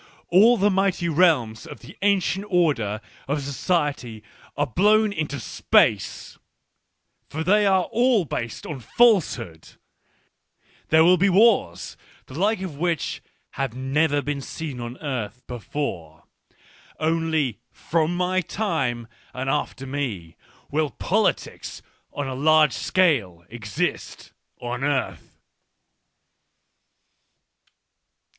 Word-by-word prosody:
All 220 +7 +6
the 205 +1 +3
mighty 190 -2 +1
realms 150 -10 +2
of - - -10
the 120 - -13
ancient 200 0 +1
order 140 - +1 0.3
of 145 +1 -1
society 140 - -2 0.3
are - - +2
blown 210 - +3
into 150 -6 -3
space 115 - +1 0.4
— - - -50
for 160 +2 -4
they 205 +4 +3
are 190 -1 +3
all 235 -2 +2
based 115 -4 -5
on 150 -3 -6
falsehood: 125 - +1 1.1
there 160 +1 +5
will 180 +2 +5
be 200 +3 +3
wars, 190 - +2 0.3
the - - -13
like 195 +6 0
of 165 -7 -6
which 170 -1 -2 0.3
have 135 -4 -3
never 145 +3 +1
been 145 -1 -3
seen 145 -2 -6
on 120 +1 -6
earth 125 -4 -4
before. 105 - -5 0.8
Only 160 -7 0
from 165 +1 -1
my 185 +1 +1
time 135 - -2 0.3
and 130 +1 -2
after 135 -2 -3
me 120 -12 -4 0.4
will 150 0 0
politics - - -2 0.3
on 145 -1 -4
a 130 - -4
large 155 +3 +4
scale 120 - +1
exist 110 -4 -4 0.3
on 125 +2 -4
earth. 130 - -2
150 Hz, 110 wpm, -23 LUFS, 125-180 Hz, 1.1 s, All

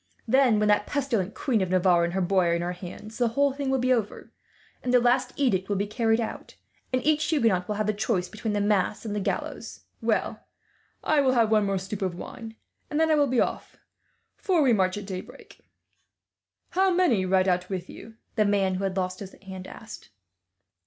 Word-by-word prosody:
Then, 255 -2 +4
when 210 0 +2
that 210 0 +2
pestilent 235 -9 -1
Queen 235 -7 0
of 185 - -1
Navarre 180 -1 +3
and 170 0 -1
her 190 - 0
boy 185 0 +2
are 170 - +2
in 170 - -2
our 175 - -2
hands, 185 +5 -9
the 240 - +3
whole 275 +4 +1
thing 280 -1 -3
will 265 - +2
be 255 0 +2
over; 225 -4 -3 0.5
and 250 - -2
the 250 - +6
last 250 +1 +2
edict 195 -9 0
will 205 - +1
be 200 +1 0
carried 225 +1 +1
out, 225 - -5 0.4
and 255 0 -1
each 305 0 +3
Huguenot 225 - +1
will 210 - -2
have 215 +1 -1
the 215 - +1
choice 205 -3 -1
between 215 +2 -4
the 205 - 0
mass 205 +1 0
and 210 -2 -3
the - - 0
gallows. 195 - -4 0.2
"Well, - - -1 0.6
I 305 -2 +3
will 260 -2 +3
have 230 -3 +3
one 215 -2 +3
more 195 0 0
stoup 195 +2 -6
of 185 -2 -1
wine, 225 +4 -9 0.3
and 295 - -1
then 320 0 +3
I - - +5
will 290 -1 +3
be 255 -2 +1
off, - - -2 0.6
for 360 -6 +2
we 255 -3 +4
march 185 -2 +1
at 205 - -6
daybreak." 185 -2 -9 1.1
"How 380 +1 +3
many 350 - +3
ride 185 0 +2
out 180 0 0
with 185 -2 -4
you?" 225 0 -12 0.2
the 215 - +5
man 200 -2 +2
who 185 +1 -3
had 190 0 -2
lost 185 0 -2
his 195 -2 -9
hand 190 -1 -8
asked. 225 0 -11
210 Hz, 215 wpm, -26 LUFS, 190-250 Hz, 1.1 s, the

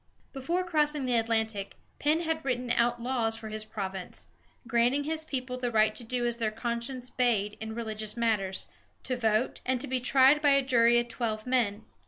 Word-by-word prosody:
Before 330 +7 -1
crossing 300 -5 +1
the 250 - 0
Atlantic, 220 -3 -1 0.2
Penn 305 +3 +2
had 320 -1 -2
written 250 -2 -1
out 240 0 +2
laws 235 -2 0
for 220 -1 -8
his 215 0 -4
province, 190 -4 -6 0.4
granting 240 +4 +2
his 315 +1 -2
people 255 -4 -4
the 245 -1 -1
right 215 -1 +3
to 235 - -6
do 240 +1 -1
as 240 -1 +1
their 225 -2 0
conscience 235 +3 -4
bade 215 -5 +1
in 220 0 -5
religious 220 -1 -4
matters, 210 -5 0 0.4
to 255 - -1
vote, 225 0 0
and 255 0 0
to 270 - -1
be 260 -1 -1
tried 265 +3 +5
by 290 -2 +5
a 275 - +2
jury 240 -2 +4
of 240 0 +1
twelve 220 -3 -3
men. 240 -5 0
240 Hz, 190 wpm, -29 LUFS, 220-260 Hz, 0.4 s, tried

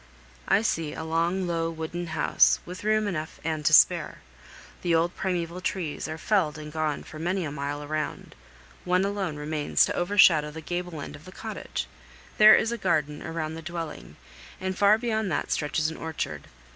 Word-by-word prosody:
I 205 - +3
see 165 -8 -1
a - - -5
long, 170 +4 0
low, 165 -1 -1
wooden 165 +2 -5
house, 160 - +3
with 180 +2 -8
room 215 0 +2
enough 160 -5 -4
and 160 -1 -2
to - - +4
spare. - - +5 0.6
The 170 -2 +2
old 170 +2 +1
primeval 180 -1 -2
trees 175 -5 -3
are 155 - -5
felled 165 -4 +1
and 150 0 -8
gone 155 -2 -1
for 155 - -10
many 175 +2 -1
a 145 - -4
mile 145 +1 -4
around; 150 +1 -4 0.5
one 180 +2 +2
alone 195 -5 -2
remains 150 0 +1
to - - -3
overshadow 175 -5 +5
the 155 +2 -8
gable 175 -1 -4
end - - -7
of 145 - -14
the 185 - -10
cottage. 220 +3 -5 0.5
There 215 0 +10
is 225 - +1
a 235 - -3
garden 150 -5 0
around 160 -1 -4
the 165 - -7
dwelling, 165 -1 -6 0.4
and 190 0 -3
far 205 +2 +5
beyond 220 -4 -1
that - - -2
stretches 155 +1 0
an 160 - -8
orchard. 80 - -5
165 Hz, 185 wpm, -27 LUFS, 155-185 Hz, 0.6 s, There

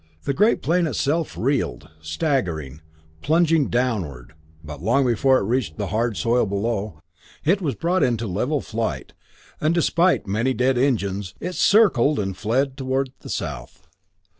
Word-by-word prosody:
The 140 - -1
great 210 - +2
plane 170 +1 +2
itself 155 +2 -1
reeled, 110 - -1
staggering, 80 - -2 0.4
plunging 160 -1 +3
downward; 95 - -2 0.3
but 75 -2 -9
long 120 +8 +2
before 130 +2 +3
it - - -1
reached 110 -6 -1
the - - -3
hard 115 -1 0
soil 120 -1 +2
below, 100 -3 -2 0.5
it 190 +6 +3
was 145 -8 -1
brought 175 +6 0
into 115 -2 +1
level 125 +9 -1
flight, 110 +1 -4 0.5
and 155 +2 +1
despite 170 +2 +2
many 115 +7 0
dead 130 +3 +2
engines, 100 -7 -1
it 180 +1 -4
circled 180 - +4
and 95 -2 -2
fled 130 +7 -1
toward 130 0 -1
the - - -11
south. - - -5
125 Hz, 145 wpm, -22 LUFS, 100-145 Hz, 0.5 s, circled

